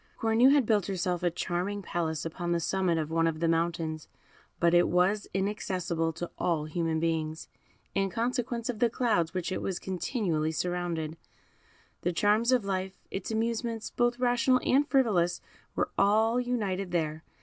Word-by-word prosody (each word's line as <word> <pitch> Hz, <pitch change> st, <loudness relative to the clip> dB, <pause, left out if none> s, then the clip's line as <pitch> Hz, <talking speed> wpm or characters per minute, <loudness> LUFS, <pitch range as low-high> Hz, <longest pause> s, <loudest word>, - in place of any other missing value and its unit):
Cornue 225 Hz, +4 st, +4 dB
had 285 Hz, -3 st, +4 dB
built 210 Hz, -4 st, +2 dB
herself 180 Hz, -2 st, -1 dB
a 175 Hz, -, +2 dB
charming 180 Hz, +4 st, -3 dB
palace 160 Hz, -3 st, -2 dB
upon 170 Hz, +1 st, -3 dB
the 170 Hz, -, +1 dB
summit 185 Hz, -1 st, +1 dB
of 155 Hz, -1 st, -2 dB
one 165 Hz, 0 st, +2 dB
of 160 Hz, -1 st, -2 dB
the 165 Hz, -, +1 dB
mountains, 165 Hz, -1 st, -1 dB, 0.5 s
but 170 Hz, 0 st, +3 dB
it 175 Hz, 0 st, +5 dB
was 190 Hz, +4 st, +2 dB
inaccessible 185 Hz, -4 st, -1 dB
to 170 Hz, +2 st, -6 dB
all 160 Hz, -4 st, 0 dB
human 160 Hz, 0 st, -1 dB
beings, 160 Hz, -1 st, -2 dB, 0.4 s
in 195 Hz, 0 st, +1 dB
consequence 235 Hz, +2 st, -2 dB
of 240 Hz, -4 st, -3 dB
the 240 Hz, -, +4 dB
clouds 225 Hz, -9 st, +1 dB
with -, -, -28 dB
which 175 Hz, -, -4 dB
it -, -, -2 dB
was 190 Hz, -2 st, -2 dB
continually 180 Hz, -, -1 dB
surrounded. 170 Hz, -1 st, -2 dB, 0.8 s
The 175 Hz, -, 0 dB
charms 210 Hz, +6 st, +3 dB
of 250 Hz, -5 st, +3 dB
life, 190 Hz, -1 st, -2 dB, 0.2 s
its 195 Hz, -, -4 dB
amusements, 230 Hz, 0 st, -2 dB
both 240 Hz, 0 st, +1 dB
rational 250 Hz, +1 st, +3 dB
and 285 Hz, +3 st, +3 dB
frivolous, 195 Hz, -10 st, +2 dB, 0.4 s
were -, -, 0 dB
all 220 Hz, +4 st, +4 dB
united 205 Hz, -7 st, -1 dB
there. 160 Hz, -2 st, -1 dB
185 Hz, 165 wpm, -29 LUFS, 165-225 Hz, 0.8 s, it